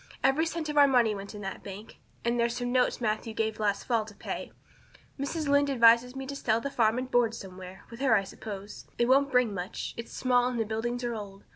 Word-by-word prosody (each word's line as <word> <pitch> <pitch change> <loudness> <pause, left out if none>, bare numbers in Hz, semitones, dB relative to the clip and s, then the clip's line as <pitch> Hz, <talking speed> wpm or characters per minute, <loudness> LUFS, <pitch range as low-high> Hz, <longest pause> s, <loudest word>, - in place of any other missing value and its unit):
Every 275 +5 +3
cent 325 -1 -3
of 295 -1 +2
our 285 - +8
money 245 -5 +3
went 200 +1 -7
in 205 - -7
that 195 -1 -5
bank; 200 +3 -10 0.3
and 235 0 +1
there's 235 0 +1
some 245 0 -2
notes 250 0 +2
Matthew 220 0 -2
gave 220 -1 -1
last 205 -2 0
fall 230 -3 +1
to 210 -1 -13
pay. - - -6 0.7
Mrs. 300 +2 -2
Lynde 285 0 +3
advises 235 0 +5
me 270 0 -5
to 280 +1 -6
sell 225 -5 +1
the 280 +4 -4
farm 225 -3 +2
and 255 +1 -4
board 235 -2 +3
somewhere 185 0 -10
with 230 - -10
her 265 -4 +4
I 200 - +2
suppose. 200 +1 -8
It 240 - +2
won't 275 +2 +4
bring 250 -4 +3
much 180 -1 -5
it's 235 - -7
small 250 -1 +2
and 250 -2 -2
the 225 - +1
buildings 240 +3 -3
are 240 -1 -1
old. 200 -3 -8
235 Hz, 235 wpm, -29 LUFS, 215-260 Hz, 0.7 s, our